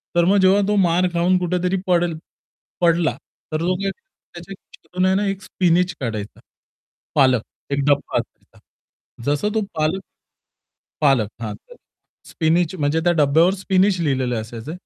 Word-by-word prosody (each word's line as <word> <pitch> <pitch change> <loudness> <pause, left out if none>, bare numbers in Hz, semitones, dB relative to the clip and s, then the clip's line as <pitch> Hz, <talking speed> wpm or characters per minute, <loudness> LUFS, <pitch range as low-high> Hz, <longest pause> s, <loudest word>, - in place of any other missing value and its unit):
तर 170 0 +4
मग 195 +3 +4
जेव्हा 190 +2 +5
तो 210 - +1
मार 175 +2 +2
खाऊन 175 +2 +2
कुठेतरी 180 +1 0
पडेल 175 -2 +1 0.6
पडला, 170 -2 +2 0.4
तर 155 0 -2
तो 180 +2 +1
काय 195 - 0
त्याच्यात 190 - -14
ना 190 +2 +2
एक 195 -1 -3
स्पिनच 180 -1 +1
काढायचा. 110 -5 -5 0.8
पालक 130 -5 +4 0.3
एक 140 - 0
डब्बा 145 -1 +1
असायचा. - - -11 0.7
जसं 145 +8 0
तो 220 - +2
पालक 160 +5 0 1.0
पालक, 135 -8 +3
हां. 110 -2 -4 0.7
स्पिनच 165 +1 +1
म्हणजे 150 -1 0
त्या 175 - +4
डब्यावर 160 +6 +4
स्पिनच 190 0 +1
लिहिलेलं 130 -6 0
असायचं. 115 +6 -8
170 Hz, 135 wpm, -21 LUFS, 145-185 Hz, 1.0 s, जेव्हा